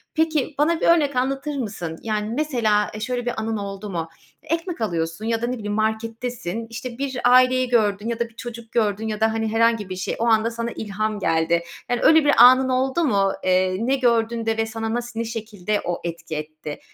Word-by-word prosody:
Peki, 315 -3 0
bana 320 +3 +2
bir - - +2
örnek 300 -5 +4
anlatır 270 +3 -1
mısın? 185 -9 -5
Yani, 215 -1 -2
mesela, 235 -8 +1
eee, 210 - -6
şöyle 245 +2 -3
bir 245 - -1
anın 220 0 -2
oldu 200 0 -6
mu? 165 -3 -3 0.3
Ekmek 330 -3 -3
alıyorsun 170 -1 -2
ya 225 0 0
da 235 - 0
ne 250 - -1
bileyim, 210 -2 -4
markettesin, 225 0 -2
işte, 235 +1 -7
bir 270 -2 -3
aileyi 255 0 +5
gördün 210 -3 +1
ya 235 -1 -2
da 235 -1 -1
bir 225 - -26
çocuk 235 -1 -8
gördün 215 -1 0
ya 215 -1 -3
da, 220 0 +2
hani, 225 0 -1
herhangi 225 -3 +2
bir 185 - -4
şey, 185 - -3
o 230 - +1
anda 225 0 +3
sana 235 0 -3
ilham 215 0 -3
geldi. 170 -1 +1 0.3
Yani, 245 0 0
öyle 320 -1 +6
bir 290 - +5
anın 255 +1 +7
oldu 260 +5 +1
mu? 200 -9 +2
Eee, 185 0 +2
ne 250 +5 +1
gördün 235 -3 +1
de 225 0 0
ve 225 - +1
sana 225 0 -4
nasıl, 240 -1 -4
ne 230 - -1
şekilde 215 -3 -3
o 175 0 -2
etki 170 -1 -5
etti? 155 0 -6
225 Hz, 210 wpm, -23 LUFS, 210-250 Hz, 0.3 s, anın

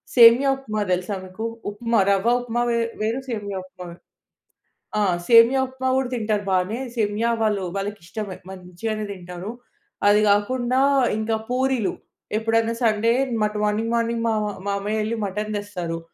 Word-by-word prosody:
సేమియా 240 +3 +8
ఉప్మా 215 -6 -4
తెలుసా 180 +3 -1
మీకు? 185 +5 -6 0.3
ఉప్మా 230 +1 0
రవ్వ 200 +4 +3
ఉప్మా 240 -1 -2
వే 235 - +1 0.2
వేరు. 225 +4 0
సేమియా 205 -4 -4
ఉప్మా 185 -1 -12
వేరు. 170 - -13 1.0
ఆ! - - +2 0.3
సేమియా 235 +3 +7
ఉప్మా 260 0 -3
కూడా 265 -2 0
తింటారు 215 -3 -1
బానే. 185 +6 0 0.2
సేమియా 220 +1 0
వాళ్ళు 205 -3 +1
వాళ్ళకి 200 0 -4
ఇష్టమే. 200 -1 -6
మంచిగానే 190 +4 -5
తింటారు. 180 +2 -7 0.6
అది 210 +1 +5
కాకుండా 245 +5 +2 0.4
ఇంకా 220 +1 0
పూరీలు 255 -4 +1 0.5
ఎప్పుడైనా 225 +1 +1
సండే 225 0 +3 0.3
మట్ 210 0 -1
మార్నింగ్ 215 +2 0
మార్నింగ్ 230 0 0
మా - - +2 0.4
మామయ్య 205 +2 -1
యేళ్ళి 220 +2 -1
మటన్ 210 +2 -4
తెస్తారు. 180 -5 -4
215 Hz, 140 wpm, -23 LUFS, 200-230 Hz, 1.0 s, సేమియా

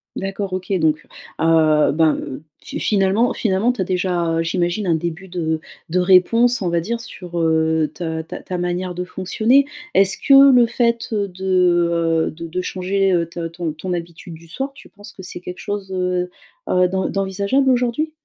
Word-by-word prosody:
D'accord. 195 0 -4
OK, 185 +2 -4
donc 155 -1 +1 0.3
heu, 160 -2 +4
ben, 155 +1 +3
heu, 130 - -6 0.2
t - - -5
finalement 205 +3 +2
finalement, 215 +3 +1
tu 245 - -4
as - - +2
déjà, 175 -3 -1
heu, - - +1
j'imagine, 175 +3 -1
un 165 - +3
début 170 +3 -4
de 160 -3 -2 0.3
de 180 +2 +1
réponse, 215 +7 +4
on 180 - 0
va 170 0 +1
dire, 230 +7 -3
sur, 180 -6 -7
heu, 160 -1 +1
ta 160 -1 -4
ta - - -8
ta 180 - -5
manière 180 0 -2
de 180 - -3
fonctionner. 220 +9 +2 0.3
Est-ce 195 0 +3
que 275 0 +7
le 245 -2 +6
fait, 235 0 0
heu, 205 -2 0
de, 190 +1 -11 0.8
heu, - - -3
de 165 +1 -8
de 180 +3 -3
changer, 190 +1 0
heu, 170 -2 +1
t 170 - -9
ton 165 -3 -3
ton 180 +4 -5
habitude 170 0 -7
du 165 +1 -13
soir, 270 - -4
tu - - -16
penses 205 0 -13
que 190 - -11
c'est 180 -1 -7
quelque 180 0 -8
chose, 200 -2 -5
heu 180 -1 -1 0.4
heu, 180 0 +3
d'en 190 +1 -1
d'envisageable 200 +7 0
aujourd'hui? 250 +5 +1
185 Hz, 190 wpm, -20 LUFS, 170-205 Hz, 0.8 s, que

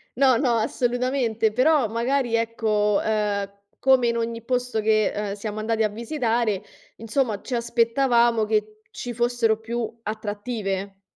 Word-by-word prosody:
no, 260 -2 +4
no, 250 -3 +2
assolutamente. 240 -1 0
Però 260 +1 +3
magari, 240 +1 0
ecco, 215 -3 +1
ehm, 205 -2 0 0.3
come 260 -2 +4
in 235 - +1
ogni 230 0 -3
posto 250 -2 -1
che, 215 0 +2
ehm, 205 -1 -3
siamo 210 +1 -5
andati 220 +1 0
a 215 - +2
visitare, 230 -3 -1 0.3
insomma, 225 -1 -1
ci 255 - -4
aspettavamo 235 -1 +2
che 215 0 -1
ci 245 -1 -6
fossero 240 -2 +1
più 230 0 -4
attrattive. 205 -2 -4
230 Hz, 135 wpm, -24 LUFS, 215-245 Hz, 0.3 s, no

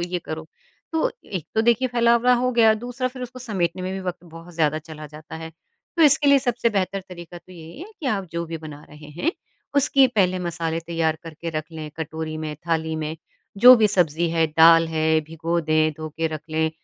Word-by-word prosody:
ये 175 +1 -2
करो। 160 0 -6 0.5
तो 320 - +1
एक 175 -6 -6
तो 220 - +3
देखिए 235 +2 +2
फैलावड़ा 235 0 +3
हो 255 +1 +1
गया, 225 -2 +5
दूसरा 245 +3 -3
फिर 255 0 -9
उसको 250 +1 -8
समेटने 185 -7 -2
में 185 +1 -3
भी 195 - -4
वक़्त 180 -1 -5
बहुत 165 +1 -13
ज़्यादा 155 -1 +1
चला 155 -1 -10
जाता 155 +2 -11
है। 160 0 -8 0.5
तो 330 - +4
इसके 295 0 +5
लिए 280 - +7
सबसे 245 -3 0
बेहतर 195 -1 -1
तरीका 175 -1 -10
तो 175 +2 -18
यही 165 - -11
है 370 - -7
कि 290 - -4
आप 200 -6 0
जो 170 0 -2
भी 165 0 -5
बना 150 -2 -10
रहे 150 0 -13
हैं, 335 - +1 0.4
उसकी 275 -1 +5
पहले 190 -6 +1
मसाले 165 -2 -3
तैयार 165 -1 -1
करके 165 +1 -7
रख 155 -1 -3
लें 155 -1 -7
कटोरी 160 0 -5
में, 155 -1 -4
थाली 160 -1 -1
में 155 +1 -4 0.4
जो 250 +5 +10
भी 220 -2 +4
सब्ज़ी 170 -4 +1
है, 165 -1 +2
दाल 165 +1 +6
है 160 0 +1
भिगो 165 +2 -3
दें, 155 0 +2
धो 155 0 -6
के 165 - 0
रख 155 -1 -5
लें, 160 0 0
170 Hz, 215 wpm, -23 LUFS, 160-220 Hz, 0.5 s, जो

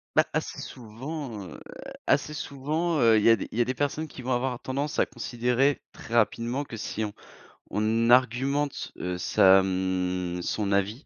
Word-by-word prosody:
Bah, - - +5
assez - - -2
souvent, 120 0 -7
heu, 80 - -10 0.5
assez 150 - +2
souvent, 155 +4 -1
heu, 115 -2 +6
il 105 - 0
y - - +7
a 115 - +7
des 100 - -6
il 110 - -6
y 120 - +5
a - - +2
des 130 - -1
personnes 145 +3 -2
qui 135 - -10
vont 125 +1 -2
avoir 125 0 -1
tendance 140 +3 -3
à - - +4
considérer, 125 +4 0
très 115 - -9
rapidement, 120 +4 +1
que 115 - -8
si 110 0 -4
on 105 - -5 0.6
on 110 +2 +1
argumente, 130 +4 +2
heu, 90 0 -3
sa, 95 +1 +6
mmh, 90 -1 -1
son 100 +2 -2
avis, 100 +7 0
120 Hz, 185 wpm, -27 LUFS, 105-135 Hz, 0.6 s, y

